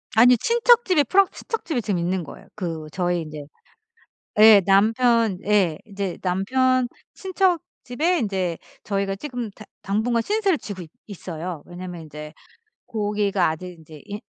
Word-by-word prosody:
아니요. 245 +2 +7
친척 475 0 +4
집에 345 -6 +3
프랑스 390 +8 +3
친척 455 - -5
집에 270 -8 -1
지금 200 -4 -1
있는 180 +1 -1
거예요. - - -12
그 165 -6 -5
저희 175 -2 -1
인제 155 -2 -8 0.9
예. 215 -2 +9
남편 225 +1 +3
예. 195 -7 +2
이제 200 -3 -4
남편 250 +7 +1 0.3
친척 375 -2 +1 0.2
집에 315 +8 0
인제 190 -6 -1 0.3
저희가 195 -1 -1
지금 245 -1 -5
당 215 +1 -14 0.2
당분간 225 +4 0
신세를 405 - +1
지고 200 -6 -8
있 165 - -10 0.2
있어요. 175 -4 -7
왜냐면 175 -1 -8
인제 150 0 -9 0.5
고기가 205 -4 0
아직 180 +3 -6
인제 155 -2 -14
인 205 +1 -6
205 Hz, 295 characters per minute, -23 LUFS, 180-245 Hz, 0.9 s, 예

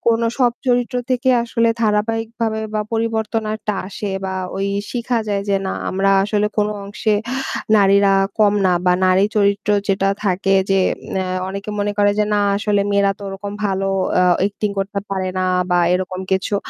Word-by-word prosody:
কোনো 230 0 0
সব 245 -2 +4 0.2
চরিত্র 245 0 +1
থেকে 255 +1 +1
আসলে 230 -1 +1
ধারাবাহিকভাবে 225 +1 0
বা 215 - 0
পরিবর্তনটা 220 -1 -1
আসে 205 0 -5 0.2
বা 190 - -3 0.2
ওই 195 0 -1 0.2
শিখা 240 -1 -1
যায় 200 -1 0
যে 200 - +3
না - - -2 0.2
আমরা 195 +1 +1
আসলে 210 0 +1
কোন 210 0 +2 0.2
অংশে 210 +1 -1 0.6
নারীরা 200 -1 +4 0.3
কম 205 -1 +5
না 185 - +4
বা 180 - +5
নারী 185 +2 +4
চরিত্র 200 0 +1 0.2
যেটা 195 0 +1
থাকে 195 0 +1
যে 195 0 +3 0.4
নে 190 - 0 0.2
অনেকে 200 +2 -6
মনে 205 0 0
করে 205 0 +4
যে - - +4
না 205 - +2 0.2
আসলে 205 -1 +1
মেয়েরা 200 0 +3
তো - - -17
ওরকম 195 +1 -6
ভালো 195 0 -1 0.3
আ - - +4 0.2
acting 205 0 -2
করতে 200 +1 -2
পারে 190 -1 -2
না 185 - 0 0.3
বা 180 - +3 0.2
এরকম 185 0 -2
কিছু। 190 +2 0
205 Hz, 170 wpm, -19 LUFS, 195-220 Hz, 0.6 s, কম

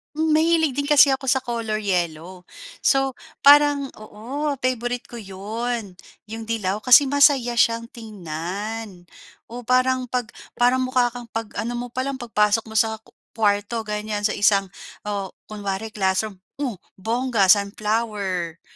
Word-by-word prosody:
Hmm, 315 +1 0
mahilig 315 -3 +2
din 285 - 0
kasi 290 -1 +6
ako 270 0 -1
sa 265 0 +2
color 225 -3 -3
yellow. 180 -1 -3 0.4
So 270 -2 +2 0.2
parang, 285 -1 +6
oo 250 +8 -4
favorite 245 -1 -2
ko 240 - -8
'yon 210 0 -5 0.3
'yong 225 0 -6
dilaw 210 -4 -1
kasi 250 +5 +6
masaya 275 -4 +4
siyang 230 0 +2
tingnan. 200 - -7 0.4
Oh 245 0 -8
parang 255 +1 +2
pag 245 -1 -3 0.2
para 245 +1 +3
mukha 255 -1 +1
kang 245 0 -9
pag 225 -1 -3
ano 240 +2 -2
mo 245 +1 -4
pa 255 +2 -3
lang, 275 -1 -4
pagpasok 215 -2 +2
mo 220 - -3
sa 220 0 +1
ku - - -23 0.2
kuwarto 210 +1 0
ganyan 210 -1 -4
sa 210 0 0
isang 200 -2 +3 0.4
oh 200 -2 -4 0.2
kunwari 205 0 -4
classroom. 195 0 -1 0.2
Oh, 245 -8 -2 0.2
bongga 225 -1 0
sunflower. 200 -4 0
225 Hz, 145 wpm, -22 LUFS, 205-255 Hz, 0.4 s, kasi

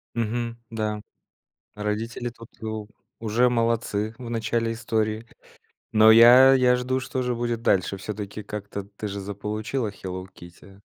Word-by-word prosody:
Мгм, 115 +1 -2
да, 110 -1 -2 0.8
родители 110 +3 -3
тут 115 -1 -14
у 110 -1 -4 0.3
уже 115 +3 +2
молодцы 115 -2 0
в 125 -2 -8
начале 115 0 -1
истории. 110 -1 -2 0.7
Но 110 0 +7
я 120 +4 +9
я 125 -1 +4
жду, 130 +1 -1
что 130 0 -3
же 125 0 -1
будет 120 -1 -2
дальше. 95 -2 +2
Всё-таки 105 +1 -6
как-то 100 -1 -6
ты 105 +1 -7
же 100 0 -5
заполучила 105 +4 -3
Hello 95 -1 -7
Kitty. 95 +3 -15
110 Hz, 135 wpm, -25 LUFS, 105-120 Hz, 0.8 s, я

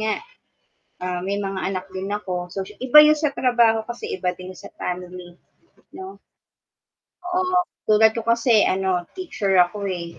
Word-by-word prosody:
nga 215 0 0 0.9
ah, 180 -1 -2
may 200 +1 -1
mga 195 -1 -4
anak 185 -1 -4
din 190 +1 -4
ako, 180 -3 -5
so 195 0 -3
sy - - -14
iba 280 +4 +7
yun 305 0 +4
sa 300 -2 -1
trabaho, 235 -3 +3
kasi 240 +1 -8
iba 180 -1 -1
din 185 0 -9
yun - - -16
sa - - -10
family. 180 -1 -6 0.6
'No? 380 +1 -9 1.1
Oo 365 +1 0 0.3
tulad 215 +1 +5
ko - - -2
kasi 230 -1 +3
ano 185 -2 0
teacher 330 - -3
ako, 200 +3 -6
eh. 170 -2 -6
200 Hz, 165 wpm, -22 LUFS, 180-240 Hz, 1.1 s, iba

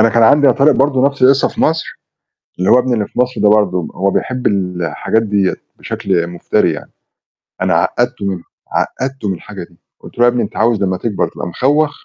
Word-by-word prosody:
أنا 115 - +5
كان 115 +1 +2
عندي 140 +6 +5
يا 130 - +6
طارق 140 +3 +4
برضه 135 0 +2
نفْس 140 -1 -3
القصّة 135 +2 +5
في - - -7
مصر، 160 +1 -1 0.6
اللي 90 - +1
هو 125 - +6
ابني 125 0 0
اللي 110 -3 0
في - - -9
مصر 125 0 0
ده 105 - +5
برضه، 95 -5 +2
هو 100 +1 +1
بيحب 125 +4 -1
الحاجات 90 +2 -1
ديّة 100 -3 0 0.2
بشكل 85 -3 -2
مفتري 85 0 0
يعني، - - -9 0.7
أنا - - +1
عقّدته - - 0
من 95 -3 -3 0.3
عقّدته 130 -5 -3
من - - 0
الحاجة 95 +2 -9
دي، 85 0 -17 0.2
قُلت - - -14
له: 120 - +3
"يا 120 - +6
ابني 120 0 -1
أنت - - -5
عاوز 110 -2 +2
لمّا 95 -1 0
تكبر 105 -2 -2
تبقى - - -7
مخوّخ 145 - +1
110 Hz, 210 wpm, -15 LUFS, 95-130 Hz, 0.7 s, يا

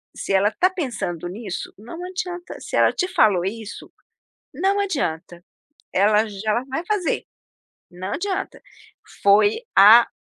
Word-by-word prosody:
se - - -3
ela 195 +2 +3
tá 370 - +2
pensando 235 - -4
nisso, 195 -1 -6
não 225 - -10
adianta, 360 -1 -6
se - - -6
ela - - +4
te 365 - -1
falou 215 - +3
isso, 220 +2 -7 0.6
não 385 +8 +1
adianta, 175 - -3 0.5
ela 210 +3 +3
já 210 +1 -4
ela 235 +4 0
vai 315 +6 -3
fazer, 410 -5 -1 0.7
não 180 +2 -7
adianta.". 390 0 -4 0.6
Foi 205 +1 +5 0.2
a 220 +4 +8
220 Hz, 135 wpm, -22 LUFS, -, 0.7 s, a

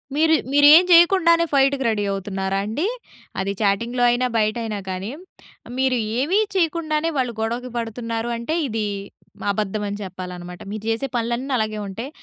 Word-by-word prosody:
మీరు 320 +2 +4 0.2
మీరేం 290 +4 +8
చేయకుండానే 335 -1 +6
ఫైట్‌కి 275 -1 +3
రెడీ 215 -2 0
అవుతున్నారా 195 0 -2
అండి? 250 - -2 0.5
అది 195 +1 -1
చాటింగ్‌లో 235 +5 +1
అయినా 245 +1 +1
బయటైనా 215 -1 -1
కానీ. 190 +4 -4 0.7
మీరు 260 -1 +2 0.2
ఏమి 340 +10 +2 0.2
చేయకుండానే, 330 -2 0
వాళ్ళు 250 -2 0
గొడవకి 235 +3 -2
పడుతున్నారు 230 0 -3
అంటే 235 +8 -3
ఇది 220 -2 -2 0.7
అబద్ధం 210 +1 -2
అని 200 - -4
చెప్పాలనమాట. 180 -1 -8
మీరు 215 0 -6
చేసే 225 +5 -1
పనులన్ని 240 +3 -1
అలాగే 215 -1 -2
ఉంటాయి. 230 +8 -6
235 Hz, 135 wpm, -22 LUFS, 210-280 Hz, 0.7 s, మీరేం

